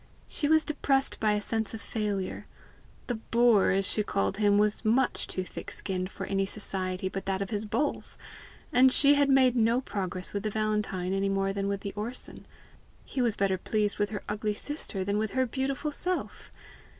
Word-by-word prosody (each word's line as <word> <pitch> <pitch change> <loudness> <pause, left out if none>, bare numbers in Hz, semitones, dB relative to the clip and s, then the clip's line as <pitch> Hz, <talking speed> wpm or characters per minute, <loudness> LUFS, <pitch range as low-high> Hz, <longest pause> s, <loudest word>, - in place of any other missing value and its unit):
She 290 - -1
was 315 +1 +4
depressed 275 -3 0
by 215 -1 +2
a 210 - 0
sense 225 0 -2
of - - -7
failure; 205 -4 -3 0.6
the 245 - -2 0.2
boor, 235 -4 +5
as 195 +1 +2
she 210 - +1
called 100 - -1
him, 205 -1 +4
was 210 +1 +2
much 240 +4 +1
too 185 - -3
thick - - -8
skinned 185 -1 -3
for - - -6
any 195 0 0
society 190 -2 -3
but 195 +1 -5
that 190 -1 0
of 200 +2 -4
his 210 0 -2
bulls! 290 +7 -1 0.6
and 255 +1 +6
she 285 +2 +8
had 285 -1 +3
made 260 -2 +5
no 230 +1 +3
progress 185 -7 -3
with 200 - -1
the 215 - -2
Valentine 210 -4 -1
any 195 0 +1
more 195 0 0
than 200 0 -2
with 200 0 -2
the 200 - -5
Orson; 225 +4 -6 0.6
he 260 - -3
was 235 -4 +1
better 190 -2 +1
pleased 210 +1 -1
with 205 0 +1
her 210 - -5
ugly 210 0 -2
sister 255 -8 -4
than 200 +2 0
with 215 -1 -2
her 260 0 +2
beautiful 270 +4 -2
self! 360 +5 -3
210 Hz, 195 wpm, -29 LUFS, 195-245 Hz, 0.6 s, she